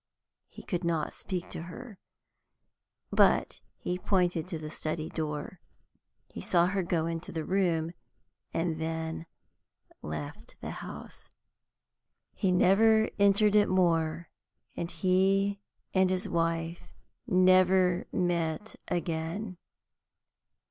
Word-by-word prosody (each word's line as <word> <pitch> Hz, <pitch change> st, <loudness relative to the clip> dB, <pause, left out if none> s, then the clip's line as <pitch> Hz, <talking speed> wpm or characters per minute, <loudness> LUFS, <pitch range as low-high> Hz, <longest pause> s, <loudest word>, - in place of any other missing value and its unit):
He -, -, -12 dB
could 180 Hz, -1 st, -3 dB
not 165 Hz, -3 st, 0 dB
speak 180 Hz, -2 st, -5 dB
to -, -, -4 dB
her, 190 Hz, +5 st, -9 dB, 1.1 s
but -, -, +3 dB, 0.2 s
he 180 Hz, 0 st, -3 dB
pointed 180 Hz, -3 st, +1 dB
to 175 Hz, -3 st, -4 dB
the 155 Hz, -1 st, -7 dB
study 155 Hz, 0 st, -3 dB
door. 150 Hz, +2 st, -4 dB, 0.7 s
He -, -, -8 dB
saw 175 Hz, -1 st, +3 dB
her 190 Hz, +2 st, 0 dB
go 170 Hz, -2 st, 0 dB
into 165 Hz, 0 st, -4 dB
the 160 Hz, -2 st, -3 dB
room, 170 Hz, -4 st, +1 dB, 0.6 s
and 165 Hz, -1 st, -1 dB
then 160 Hz, 0 st, -3 dB, 0.7 s
left 75 Hz, -1 st, -7 dB
the -, -, -5 dB
house. -, -, -9 dB, 1.0 s
He 190 Hz, -, +1 dB
never 220 Hz, +5 st, +4 dB
entered 200 Hz, +1 st, +5 dB
it 205 Hz, -1 st, +5 dB
more, 165 Hz, -3 st, +1 dB, 0.4 s
and 170 Hz, -, -3 dB
he 195 Hz, +2 st, +2 dB, 0.3 s
and 190 Hz, -1 st, +4 dB
his 185 Hz, -1 st, -1 dB
wife 165 Hz, 0 st, -2 dB, 0.3 s
never 185 Hz, -2 st, +4 dB
met 175 Hz, +2 st, -1 dB
again. 175 Hz, +3 st, -3 dB
175 Hz, 110 wpm, -30 LUFS, 165-190 Hz, 1.1 s, entered